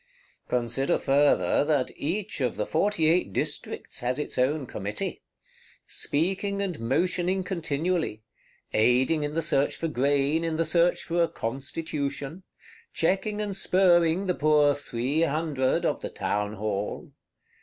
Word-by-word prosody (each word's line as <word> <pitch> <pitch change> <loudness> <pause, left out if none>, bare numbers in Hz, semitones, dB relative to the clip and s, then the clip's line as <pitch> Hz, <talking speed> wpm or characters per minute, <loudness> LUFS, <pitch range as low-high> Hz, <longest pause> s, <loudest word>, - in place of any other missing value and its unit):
Consider 125 +2 0
farther 135 -9 +3
that 145 -4 +1
each 190 +3 -3
of 125 -3 0
the 105 - -2
Forty 165 -1 +1
eight 165 - +2
Districts - - -3
has 125 +1 -1
its 150 - -3
own 135 +3 +1
Committee; 105 -2 -4 0.6
speaking 195 +6 0
and 190 -5 -2
motioning 175 +9 0
continually; 165 - -2 0.5
aiding 125 +8 +3
in 145 +1 -3
the 165 - 0
search 145 -3 +1
for 165 - -2
grain, 145 +2 +1
in 165 -1 -1
the 165 +1 +1
search 175 +1 +2
for 170 0 0
a 170 - +4
Constitution; 140 +4 -4 0.5
checking 195 +5 0
and 205 -2 -2
spurring 180 -1 +3
the 180 - +1
poor 150 -2 +4
Three 140 +2 -2
Hundred 150 -4 0
of - - 0
the - - -4
Townhall. 105 0 -3
150 Hz, 135 wpm, -27 LUFS, 130-175 Hz, 0.6 s, a